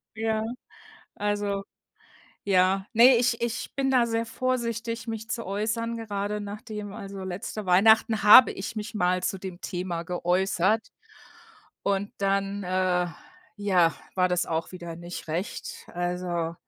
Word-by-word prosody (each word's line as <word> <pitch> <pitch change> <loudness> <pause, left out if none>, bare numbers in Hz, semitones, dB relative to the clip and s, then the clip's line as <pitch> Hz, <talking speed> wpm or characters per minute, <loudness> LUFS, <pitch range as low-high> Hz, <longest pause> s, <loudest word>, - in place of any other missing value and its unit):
Ja, 220 0 0 0.7
also 205 -1 -1 0.8
ja 190 0 +3
ne, 240 +3 +7
ich 235 0 +1
ich 235 -1 -3
bin 270 -1 0
da 245 -2 +4
sehr 230 0 -1
vorsichtig, 235 -2 -2
mich 225 0 -5
zu 230 -3 -3
äußern, 225 +4 -2
gerade 210 -1 -3
nachdem 205 0 -7
also 200 -3 -7
letzte 200 +3 -5
Weihnachten 220 +4 +4
habe 210 +5 +9
ich 220 +4 -6
mich 215 +1 -5
mal 180 -2 +1
zu 195 - -1
dem 185 -1 -8
Thema 175 -2 -3
geäußert 185 +4 +1 1.0
und 200 0 0
dann, 195 0 0
äh, 180 -1 +1 0.5
ja, 185 -5 +3 0.2
war 185 -1 +3
das 180 0 +1
auch 165 +1 -2
wieder 170 -2 -7
nicht 175 0 -8
recht. 170 +6 -5
Also 175 -1 -2
200 Hz, 135 wpm, -26 LUFS, 180-225 Hz, 1.0 s, habe